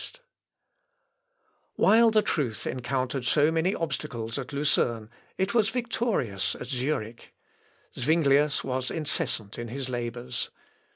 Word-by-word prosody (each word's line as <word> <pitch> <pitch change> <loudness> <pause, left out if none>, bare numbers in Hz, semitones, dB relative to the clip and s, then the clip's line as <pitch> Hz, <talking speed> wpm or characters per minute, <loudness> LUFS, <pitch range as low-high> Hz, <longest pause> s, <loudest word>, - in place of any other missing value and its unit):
] - - -45
While 230 +1 +6
the 215 -1 +3
truth 125 -9 -1
encountered 130 +1 -2
so 145 +5 +3
many 165 +4 +1
obstacles 125 -7 -3
at 135 - -6
Lucerne 120 -6 0 0.3
it 190 +3 0
was 220 -3 +3
victorious 225 - -1
at - - -7
Zurich. 125 -3 -3 0.6
Zuinglius 145 +1 +3
was 130 -1 -2
incessant 120 -9 -3
in 120 - -4
his 130 +2 -4
labours. 120 0 -3
135 Hz, 115 wpm, -27 LUFS, 120-165 Hz, 0.6 s, While